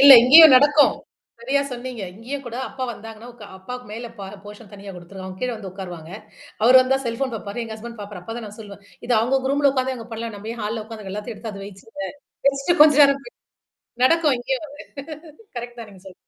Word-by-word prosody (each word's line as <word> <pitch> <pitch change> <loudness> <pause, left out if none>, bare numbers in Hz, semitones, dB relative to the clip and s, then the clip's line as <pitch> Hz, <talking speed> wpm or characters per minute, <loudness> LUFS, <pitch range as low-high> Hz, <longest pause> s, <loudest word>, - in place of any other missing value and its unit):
இல்ல 275 0 +11
இங்கேயும் 295 +3 +9
நடக்கும். 290 +2 +5 0.4
சரியா 265 +4 0
சொன்னீங்க. 250 -2 -6
இங்கேயும் 255 +7 -6
கூட 240 0 -6
அப்பா 260 -1 -5
வந்தாங்கன்னா, 225 +1 -10
உ - - -22 0.2
அப்பாவுக்கு 250 +6 -8
மேல 235 +2 -6
பா 200 - -6 0.2
போர்ஷன் 210 +1 -12
தனியா 200 -1 -10
குடுத்துருக்கும். 185 +2 -10
அவங்க 185 0 -10
கீழ 250 - 0
வந்து 200 -3 -8
உட்காருவாங்க. 175 -4 -9 0.5
அவரு 250 +3 +7
வந்தா 265 +1 +1
செல்ஃபோன் 240 +3 -2
பார்ப்பாரு. 215 +2 -5
எங்க 225 -1 -7
ஹஸ்பண்ட் 235 +1 -10
பாரப்பாரு 205 -2 -8
அப்ப 225 +5 -7
தான் 230 - -7
நான் 210 +1 -12
சொல்லுவேன். 200 -2 -11 0.2
இது 245 - 0
அவவுங்க 255 +4 +1
குரூம்ல 280 +1 +3
உட்கார்ந்தே 260 -1 -1
அவுங்க 230 -2 -10
பண்ணலாம். 225 -1 -5
நம்ம 210 +2 -7
ஏன் 235 - -9
ஹால்ல 215 +1 -3
உட்கார்ந்து 215 -3 -9
எல்லாத்தையும் 210 +2 -6
எடுத்து 220 +1 -7
அது 195 -1 -9
வச்சுருங்க 195 0 -9 0.4
வச்சுட்டு 275 +5 +2
கொஞ்சம் 300 -1 +6
நேரம் 275 0 +1
போய் 485 - -14 0.7
நடக்கும் 310 0 +4
இங்கேயும் 265 +4 -3
வந்து. 290 +1 -12 0.7
கரெக்ட் 240 0 -7
தான் 225 -2 -9
நீங்க 190 -2 -16
சொல்ல. 185 - -12
235 Hz, 205 wpm, -22 LUFS, 205-265 Hz, 0.7 s, இல்ல